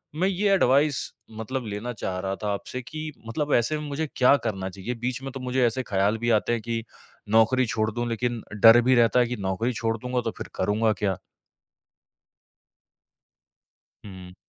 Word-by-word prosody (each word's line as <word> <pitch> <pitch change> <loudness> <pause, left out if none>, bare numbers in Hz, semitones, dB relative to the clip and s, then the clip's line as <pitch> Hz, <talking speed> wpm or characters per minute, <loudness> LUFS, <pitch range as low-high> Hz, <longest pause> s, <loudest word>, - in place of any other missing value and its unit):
मैं 185 +4 +1
ये 195 +2 +1
एडवाइस 140 -4 +3 0.4
मतलब 125 +2 -4
लेना 105 +4 -4
चाह 95 -3 -4
रहा 95 +1 -2
था 105 - 0
आपसे 130 +5 -5
कि 155 +4 -6 0.2
मतलब 145 +5 -2
ऐसे 120 +6 +2
में 150 - -6
मुझे 155 +3 -2
क्या 130 +2 +5
करना 95 -3 -2
चाहिए? 95 +6 -5
बीच 125 +2 -3
में 135 - -5
तो 135 - -7
मुझे 125 0 +1
ऐसे 125 +3 0
ख़्याल 100 0 +1
भी 120 +1 -1
आते 115 +1 +2
हैं 115 - -1
कि 115 0 -3 0.5
नौकरी 120 +3 +4
छोड़ 110 -1 0
दूँ, 120 +2 -3
लेकिन 120 0 -2 0.2
डर 115 +1 +9
भी 130 +1 +3
रहता 120 +1 +4
है 120 - +3
कि 125 - -3
नौकरी 100 +6 -1
छोड़ 115 0 -1
दूँगा, 125 +2 -2
तो 115 -1 -3
फिर - - -6
करूँगा 105 +3 +1
क्या? 100 -4 -1 2.9
हुँ। 90 -2 -11
120 Hz, 180 wpm, -25 LUFS, 110-130 Hz, 2.9 s, डर